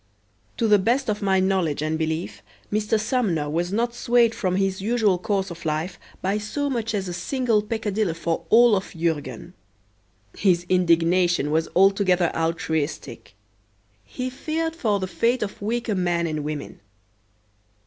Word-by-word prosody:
To 230 - +1
the 210 -1 +5
best 235 +4 +1
of 210 - -4
my 190 -1 +2
knowledge 185 -6 0
and 155 +1 -1
belief, 160 +2 -3 0.3
Mr. 215 +1 +1
Sumner 215 - 0
was 170 +4 -1
not 235 +3 0
swayed 240 -1 +3
from 185 -4 -1
his 195 0 0
usual 210 -3 +2
course 195 0 -1
of 170 0 -9
life 160 +3 -2 0.2
by 195 +3 0
so 285 +7 -3
much 230 -3 -2
as 195 -2 -2
a 175 - -4
single 240 +1 0
peccadillo 210 -4 -2
for 165 0 -2
all 235 -1 +6
of 190 -2 -4
Jurgen. 160 -1 -3 0.8
His 175 -3 +2
indignation 175 -3 +2
was 160 +1 +1
altogether 185 -2 +3
altruistic. 160 -8 -3 0.7
He 255 - -5
feared 320 +4 -3
for 215 -10 0
the 190 - -2
fate 230 +6 0
of 205 0 -7
weaker 235 +2 -1
men 175 -2 0
and 155 -2 -3
women. 150 -1 -5
190 Hz, 150 wpm, -24 LUFS, 170-220 Hz, 0.8 s, all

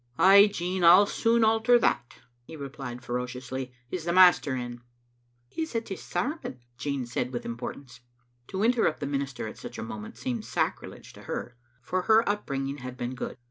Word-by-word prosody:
"Ay, 200 +2 +8
Jean, 180 -1 -2
I'll 180 +4 +8
soon 230 +2 +2
alter 225 +2 +5
that," 120 - 0 0.3
he 160 - -10
replied 135 -4 -7
fero 125 +1 -2
ciously. 130 +1 -6
" 125 - -37
Is 180 -3 -3
the 170 - 0
master 175 -6 +6
in?" 120 -1 -5 0.3
" 120 0 -42
He's 320 -6 -4
at 230 0 -2
his 195 - -5
sermon," 185 - -3 0.2
Jean 135 0 -3
said 120 +1 -3
with 120 - -5
importance. 125 +2 -7 0.5
To 190 +2 -2
interrupt 230 -8 +2
the - - -3
minister 140 -4 -3
at - - -9
such - - -8
a - - -4
moment 110 0 -8
seemed 125 -3 -3
sacrilege - - -3
to - - -13
her, 120 - -5 0.3
for 185 +7 -1
her 220 +4 +4
up 205 +1 -1
bringing 135 0 -3
had 125 0 -7
been 120 +1 -3
good. 125 - -6
140 Hz, 190 wpm, -27 LUFS, 125-190 Hz, 0.5 s, Ay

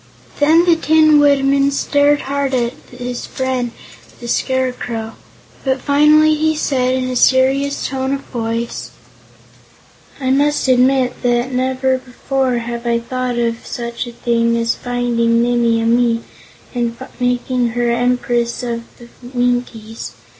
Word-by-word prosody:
Then 320 +4 +5
the 345 -2 +5
Tin 310 -1 +4
Woodman 280 -1 +3
stared 285 +1 +2
hard 275 -1 -1
at 240 -1 0 0.2
his 245 0 -6
friend 260 -2 -2 0.5
the 240 - -8
Scarecrow. 245 -3 -2 0.5
But 265 0 0
finally 300 +3 +4
he 315 +1 +1
said 255 -4 0
in 255 -1 -1
a 255 - -3
serious 270 +3 +2
tone 265 0 -2
of 275 - -7
voice: 230 -2 -4 1.3
"I 260 -1 0
must 290 +1 +2
admit 255 0 +2
that 240 +1 0
never 260 +1 0
before 255 0 -2
have 235 0 -5
I 235 0 +2
thought 250 +1 -3
of 230 -1 -1
such 235 0 -5
a - - -7
thing 235 0 0
as 230 0 +1
finding 235 -1 0
Nimmie 235 -1 +2
Amee 230 0 +2 0.5
and 235 -2 -2 0.2
making 245 0 0
her 240 -1 +1
Empress 240 0 0
of 235 -1 -3 0.2
the 240 - -13 0.3
Winkies. 245 -3 -2
250 Hz, 130 wpm, -17 LUFS, 235-270 Hz, 1.3 s, Then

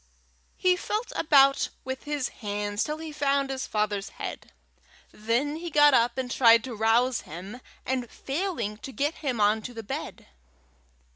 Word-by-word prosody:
He 365 -1 +3
felt 425 +5 -3
about 275 -3 +4
with 260 0 -6
his 290 -3 -2
hands 205 -1 -3
till 300 0 -3
he 320 -1 -7
found 280 -2 0
his 265 -1 -4
father's 210 -2 -1
head. - - -7 0.6
Then 240 +8 -1
he 340 +1 -5
got 295 -2 +6
up 235 0 +3
and 255 -2 -3
tried 230 -2 +6
to 255 - -6
rouse 230 +3 +2
him, 190 +10 -9 0.2
and 255 -2 -2
failing, 275 - -3
to 265 - -8
get 290 +4 -1
him 260 -7 -2
on 210 +1 +3
to 245 +2 -8
the 225 - -6
bed. - - -6
255 Hz, 160 wpm, -27 LUFS, 220-290 Hz, 0.6 s, got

